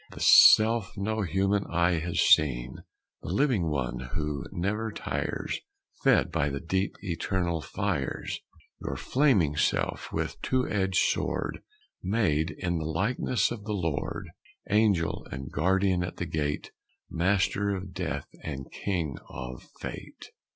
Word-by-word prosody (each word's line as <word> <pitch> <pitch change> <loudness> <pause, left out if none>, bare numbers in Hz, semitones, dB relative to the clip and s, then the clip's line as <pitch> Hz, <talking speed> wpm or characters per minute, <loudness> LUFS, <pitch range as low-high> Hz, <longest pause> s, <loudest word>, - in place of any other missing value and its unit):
The - - -11
Self 110 -1 +7
no 110 +2 -1
human 95 +2 +1
eye 85 0 +2
has 85 +2 -2
seen, 65 -4 +4 0.4
The - - -7
living 100 - +2
one 70 -5 -2 0.2
who 75 -2 -2
never 105 +5 -2
tires, - - -3 0.4
Fed - - +4
by 75 -2 +1
the 70 0 -3
deep 95 +5 -1
eternal 85 -2 -1
fires. - - -2 0.4
Your - - -3
flaming 115 - +2
Self, 75 - 0
with - - -3
two 130 -1 +1
edged 95 -2 0 0.2
sword, - - -3 0.4
Made 90 -6 +1
in 85 +2 -2
the 80 - -4
likeness 105 +9 0
of 115 -4 -5
the 105 - -2
Lord, 80 -7 -3 0.4
Angel 105 -6 +2
and 65 +1 -6
guardian 95 +3 +2
at 90 - -6
the - - -2
gate, 75 -1 -2 0.4
Master 95 +3 +1
of 95 -2 -4
Death 90 -1 -3
and 70 -4 -6
King 85 -9 -2
of 65 0 -8
Fate! - - -8
90 Hz, 135 wpm, -28 LUFS, 80-100 Hz, 0.4 s, Self